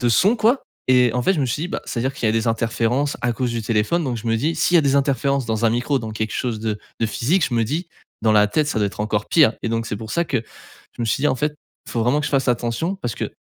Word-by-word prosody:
de 120 Hz, -, +2 dB
son 190 Hz, -, +4 dB
quoi, 235 Hz, +4 st, +2 dB, 0.3 s
et 125 Hz, -2 st, +5 dB
en 125 Hz, -, 0 dB
fait, 190 Hz, -, +3 dB
je 150 Hz, -, -1 dB
me 135 Hz, -, +1 dB
suis 125 Hz, +5 st, -2 dB
dit 180 Hz, -, -4 dB
bah, -, -, -4 dB
c'est-à-dire 130 Hz, +3 st, -2 dB
qu'il 120 Hz, -, -2 dB
y -, -, +4 dB
a -, -, 0 dB
des 115 Hz, 0 st, 0 dB
interférences 115 Hz, +4 st, 0 dB
à 120 Hz, -, 0 dB
cause 125 Hz, -1 st, -1 dB
du 115 Hz, -1 st, -2 dB
téléphone, 115 Hz, +9 st, +1 dB
donc 125 Hz, -3 st, -2 dB
je 115 Hz, -, -7 dB
me 115 Hz, 0 st, +2 dB
dis: 155 Hz, +8 st, 0 dB
«S'il 180 Hz, -, +1 dB
y -, -, +7 dB
a -, -, +6 dB
des 140 Hz, -1 st, +2 dB
interférences 140 Hz, -1 st, +1 dB
dans 110 Hz, 0 st, +1 dB
un -, -, +3 dB
micro, 125 Hz, +4 st, 0 dB
dans 110 Hz, -2 st, -6 dB
quelque 110 Hz, 0 st, -3 dB
chose 120 Hz, -3 st, -2 dB
de 110 Hz, -2 st, -2 dB, 0.2 s
de 115 Hz, -, +2 dB
physique», 150 Hz, -, +1 dB
je -, -, -9 dB
me 115 Hz, -, +2 dB
dis: 160 Hz, +9 st, -3 dB, 0.3 s
«dans 110 Hz, -, +4 dB
la 105 Hz, -1 st, +5 dB
tête, 150 Hz, +7 st, +1 dB
ça 115 Hz, -, -1 dB
doit 105 Hz, -, +2 dB
être 100 Hz, -, -6 dB
encore 105 Hz, -1 st, -1 dB
pire». 150 Hz, -9 st, +5 dB
Et 115 Hz, -, -1 dB
donc, 115 Hz, 0 st, -1 dB
c'est 105 Hz, -, -3 dB
pour 110 Hz, +1 st, -8 dB
ça 170 Hz, -, +1 dB
que 135 Hz, -, -1 dB, 0.6 s
je -, -, -3 dB
me -, -, 0 dB
suis 135 Hz, -, 0 dB
dit: 150 Hz, -, +4 dB
«En -, -, +1 dB
fait, 150 Hz, +4 st, -1 dB, 0.3 s
faut 115 Hz, -, -2 dB
vraiment 125 Hz, +6 st, +2 dB
que 145 Hz, -, -2 dB
je -, -, -3 dB
fasse 135 Hz, -2 st, +1 dB
attention.» 120 Hz, +10 st, -1 dB
Parce 120 Hz, -, -2 dB
que -, -, -4 dB
120 Hz, 310 wpm, -21 LUFS, 115-145 Hz, 0.6 s, y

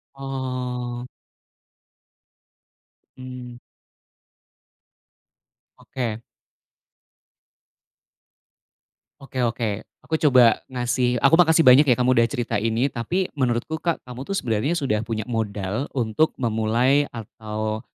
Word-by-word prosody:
Oh. 125 Hz, -2 st, -4 dB, 2.1 s
Mmm. 125 Hz, -1 st, -9 dB, 2.2 s
Oke. 115 Hz, -4 st, -5 dB, 3.0 s
Oke 130 Hz, -2 st, -4 dB
oke. 115 Hz, -3 st, -2 dB, 0.2 s
Aku 160 Hz, -, 0 dB
coba 125 Hz, -4 st, +5 dB
ngasih 125 Hz, -1 st, 0 dB
aku 140 Hz, +4 st, +6 dB
makasih 165 Hz, -1 st, +5 dB
banyak 135 Hz, +4 st, +8 dB
ya 125 Hz, -, +5 dB
kamu 125 Hz, +1 st, +2 dB
udah 115 Hz, -, +3 dB
cerita 120 Hz, -6 st, -3 dB
ini. 115 Hz, +4 st, +1 dB
Tapi 175 Hz, +10 st, -2 dB
menurutku 130 Hz, +4 st, -1 dB
Kak, 170 Hz, -2 st, -1 dB
kamu 125 Hz, 0 st, -8 dB
tuh 195 Hz, -, -4 dB
sebenarnya 120 Hz, +6 st, 0 dB
sudah 110 Hz, -8 st, 0 dB
punya 110 Hz, -1 st, -4 dB
modal 105 Hz, +1 st, -3 dB
untuk 125 Hz, +4 st, 0 dB
memulai 120 Hz, +5 st, +2 dB
atau 110 Hz, 0 st, -5 dB
125 Hz, 95 wpm, -23 LUFS, 115-135 Hz, 3.0 s, banyak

